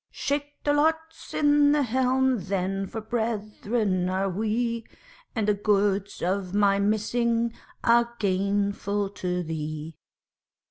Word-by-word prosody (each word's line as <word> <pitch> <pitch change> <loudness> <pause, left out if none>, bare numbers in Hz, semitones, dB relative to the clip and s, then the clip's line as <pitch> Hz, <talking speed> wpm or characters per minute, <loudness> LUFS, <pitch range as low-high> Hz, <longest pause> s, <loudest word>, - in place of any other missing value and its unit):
Shake 290 +1 -3
the 290 - +2
lots 320 +2 0
in 290 -1 +4
the 295 -1 +3
helm 260 0 +2
then 195 0 -1
for 220 - -5
brethren 215 -3 -1
are 190 +1 0
we, 225 +4 -1 0.5
And 220 -3 0
the 210 - +4
goods 200 -1 0
of 185 +1 -1
my 200 -1 +4
missing 230 +3 +1 0.3
are 235 0 +4
gainful 200 0 0
to 180 -2 -2
thee. 155 0 -5
210 Hz, 120 wpm, -26 LUFS, 195-240 Hz, 0.5 s, in